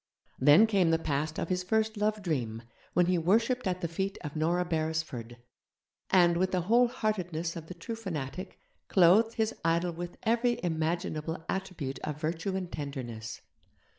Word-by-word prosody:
Then 145 +10 +7
came 195 -6 +3
the 165 - +4
past 155 0 -2
of - - -2
his 180 -1 0
first 220 +4 +1
love 210 0 0
dream, 120 -10 -2 0.3
when 180 - +4
he 180 0 +2
worshipped 230 +7 +2
at 180 0 -1
the 170 - 0
feet 190 +4 -3
of 150 -2 -6
Nora 170 +3 +1
Beresford, 155 -8 -2 0.7
and, 175 -2 +5
with 185 +1 +1
the 185 - +1
whole 235 +7 +4
heartedness 185 -9 -2
of 165 -2 -7
the 180 - -8
true 180 +7 -5
fanatic, 180 -4 -5 0.3
clothed 200 +5 +5
his 220 0 0
idol 170 +2 +2
with 175 +1 -6
every 240 +1 +2
imaginable 160 -1 -2
attribute 185 -8 -3
of 150 -1 -5
virtue 165 +5 -2
and 185 -2 -4
tenderness. 125 -7 -6
175 Hz, 165 wpm, -30 LUFS, 155-195 Hz, 0.7 s, Then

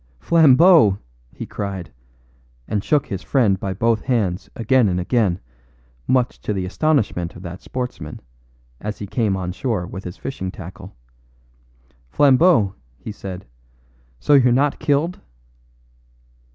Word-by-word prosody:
"Flambeau!" 160 - +5 0.3
he - - -7
cried, 95 -7 -6 0.7
and 105 -2 -2
shook 145 +2 +2
his 95 -3 -5
friend 110 -9 +2
by 95 - -3
both 110 +4 +1
hands 105 -8 -1
again 115 -1 +3
and 90 0 -1
again, 95 -2 +1 0.7
much 125 -2 +1
to 105 - -2
the 95 -2 -2
astonishment 105 - 0
of 85 - -11
that 90 0 -8
sportsman, 125 -12 -6 0.6
as 105 0 -5
he 105 - -6
came 100 -1 0
on 90 -1 -3
shore 105 -2 -2
with 95 +2 -8
his 90 - -8
fishing 95 -9 -5
tackle. 95 +1 -10 1.1
"Flambeau," 130 - +4 0.2
he 110 - -8
said, 95 -2 -8 0.7
"so 145 - +2
you're 130 -3 +6
not 135 +4 +1
killed?" 150 +4 0
105 Hz, 130 wpm, -21 LUFS, 95-130 Hz, 1.1 s, you're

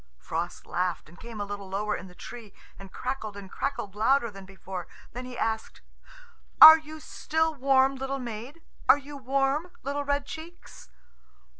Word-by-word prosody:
Frost 165 - -4
laughed, 180 -1 -2
and 175 - -17
came 230 -2 -9
a 205 - -2
little 200 -1 -7
lower 210 +2 -1
in 190 - -8
the 180 - -15
tree 230 -2 -10 0.2
and 195 -1 -11
crackled 250 -5 -4
and 195 -2 -10
crackled 200 -2 -3
louder 235 +3 +2
than 195 -1 -11
before. 190 -1 -8 0.3
Then 250 +1 -6
he 250 -1 -8
asked, 220 0 -2 0.8
"Are 315 +1 +13
you 310 0 -10
still 320 +1 -1
warm, 270 -1 +3
little 270 +1 -3
maid? 245 +5 -7 0.3
Are - - +9
you 285 +1 -10
warm, 275 +4 0
little 285 +1 -2
red 285 0 0
cheeks?" 330 +4 -11
250 Hz, 165 wpm, -27 LUFS, 200-280 Hz, 0.8 s, Are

